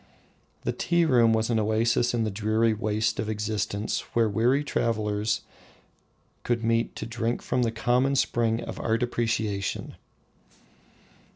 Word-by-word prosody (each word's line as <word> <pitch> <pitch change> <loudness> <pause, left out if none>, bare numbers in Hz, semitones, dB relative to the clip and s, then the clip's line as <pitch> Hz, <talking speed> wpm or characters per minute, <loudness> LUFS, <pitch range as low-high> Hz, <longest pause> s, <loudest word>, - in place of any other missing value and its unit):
The - - 0
tea 170 -1 +1
room 120 -6 +4
was 110 +1 +1
an 115 - +2
oasis 115 +3 +1
in 115 - +1
the 110 - -1
dreary 110 +2 +1
waste 110 0 -1
of 110 - -2
existence 105 -1 -2 0.2
where 115 -1 +4
weary 120 +7 +2
travellers 105 -5 -1 1.0
could 120 -1 -1
meet 115 +1 +1
to - - -5
drink 115 +1 -2
from 125 - 0
the 115 -2 +1
common 125 +4 +1
spring 115 -3 +1
of - - -7
art 115 +1 0
appreciation. 110 -5 -2
115 Hz, 135 wpm, -26 LUFS, 110-120 Hz, 1.0 s, room